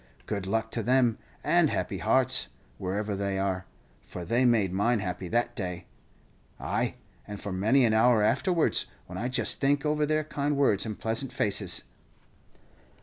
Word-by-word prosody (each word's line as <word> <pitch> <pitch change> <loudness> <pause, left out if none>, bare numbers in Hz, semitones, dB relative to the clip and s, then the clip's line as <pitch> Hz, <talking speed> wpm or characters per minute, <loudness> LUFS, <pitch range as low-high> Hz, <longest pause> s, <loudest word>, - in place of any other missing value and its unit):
Good 100 -3 -4
luck 110 +2 -1
to 115 - -2
them, 125 -1 +2 0.2
and - - +3
happy - - -2
hearts, - - +3 0.3
wherever 100 +2 -2
they 100 0 -2
are, 95 -1 -2 0.3
for 90 - -8
they 120 +5 +2
made 110 -7 +3
mine 115 +5 +2
happy 90 -2 -4
that 120 +4 0
day; 90 -5 -4 0.7
ay, - - -1 0.3
and 105 -1 -7
for 100 - -5
many 110 +8 +3
an 110 - +2
hour 110 0 +4
afterwards, 170 - +1 0.2
when 90 +1 -7
I 120 - -1
just 130 - +1
think 140 +1 +2
over 150 0 +1
their 155 0 +1
kind 145 -1 -2
words 115 -7 +2
and 110 - -5
pleasant 115 +4 -1
faces." 100 -3 0
110 Hz, 160 wpm, -28 LUFS, 95-125 Hz, 0.7 s, hour